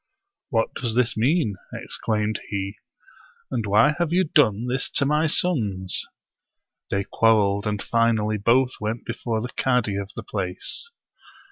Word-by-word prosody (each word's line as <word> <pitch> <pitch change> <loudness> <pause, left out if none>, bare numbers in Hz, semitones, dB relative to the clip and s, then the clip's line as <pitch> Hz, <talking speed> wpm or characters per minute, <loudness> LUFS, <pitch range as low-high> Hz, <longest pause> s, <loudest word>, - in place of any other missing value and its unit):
" 400 - -59
What 115 -6 0
does 120 -4 -3
this 125 -1 +2
mean? 120 - +1
" - - -19
exclaimed 105 -1 -1
he; 100 0 -4 0.3
" - - -28
and 115 -5 -1
why 110 +9 +5
have 170 -2 0
you 185 +2 +4
done 120 - +3
this 125 +2 -1
to 140 - +3
my 150 +3 +2
sons?" 105 - 0 0.8
They 100 0 0
quarreled, 105 -2 +2
and 105 -1 -1
finally 110 -2 +2
both 125 +5 +3
went 110 +2 -3
before 115 -2 -2
the 125 - -4
cadi 125 -6 +1
of 100 -1 -4
the - - -6
place. 100 - -4
115 Hz, 155 wpm, -24 LUFS, 105-130 Hz, 0.8 s, why